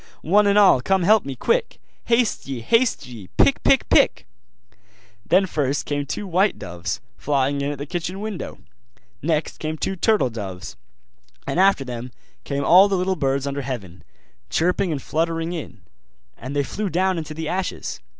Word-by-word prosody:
One 205 +6 +4
and 200 0 +3
all 195 -11 +6
come 190 +6 +1
help 210 +1 +4
me, 135 -1 -5
quick! 475 - 0 0.3
Haste 235 - +1
ye, 130 -3 -4
haste 230 - +2
ye! 115 -7 -10
pick, - - +4
pick, - - +3
pick!' - - +3 1.0
Then 190 +2 +3
first 145 -5 -1
came 145 -1 -2
two 205 - -4
white 190 +2 +1
doves, 90 0 -5 0.2
flying 140 0 0
in 140 +1 -1
at - - -8
the 140 - -5
kitchen 175 +3 -4
window; 210 -3 -5 0.6
next 155 +1 -1
came 155 0 -3
two 190 - -2
turtle 195 - +2
doves; 95 -5 -7 0.7
and - - -1
after 190 -7 +4
them 125 0 -6 0.3
came 140 0 -2
all 185 +3 +7
the 195 -1 0
little 185 +1 0
birds 140 -3 0
under 140 0 -3
heaven, 110 -10 -6 0.5
chirping 180 +2 +1
and 140 -4 -3
fluttering 165 +1 -1
in: 165 -4 -7 0.5
and 130 +4 -7
they 140 - +2
flew 205 +9 -3
down 185 +1 +1
into 155 -1 -7
the 160 0 -4
ashes. 185 +3 -3
160 Hz, 170 wpm, -22 LUFS, 135-190 Hz, 1.0 s, all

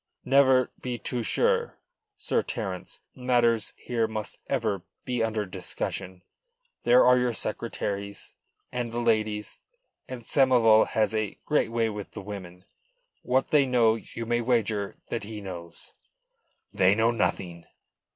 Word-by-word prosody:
"Never 130 -2 +4
be 125 -1 -3
too 120 0 -3
sure, 475 - +1 0.4
Sir 420 - +1
Terence. - - -5
Matters 120 -4 +2
here 115 -2 -1
must 110 -1 -5
ever 110 -8 0 0.2
be 125 -2 -1
under 110 -2 -1
discussion. 90 0 -5 0.6
There 125 +1 +6
are 125 0 +6
your 125 -1 +1
secretaries 100 -2 -4 0.4
and 120 -2 -3
the 115 - -4
ladies 110 -2 0 0.5
and 125 -2 -7
Samoval 120 -4 +5
has 110 0 +1
a 110 -2 -2
great 150 -6 +2
way 115 -1 +1
with 105 -2 -6
the 105 - -6
women. 95 -3 -8 0.6
What 130 +6 0
they 145 -3 +5
know 120 -3 +4
you 115 0 -6
may 120 +1 +1
wager 110 -4 0
that 115 - -3
he 105 +1 -6
knows." 85 -4 -9 0.8
"They 95 -1 +4
know 115 +2 +3
nothing." 90 -6 -2
115 Hz, 135 wpm, -27 LUFS, 105-125 Hz, 0.8 s, There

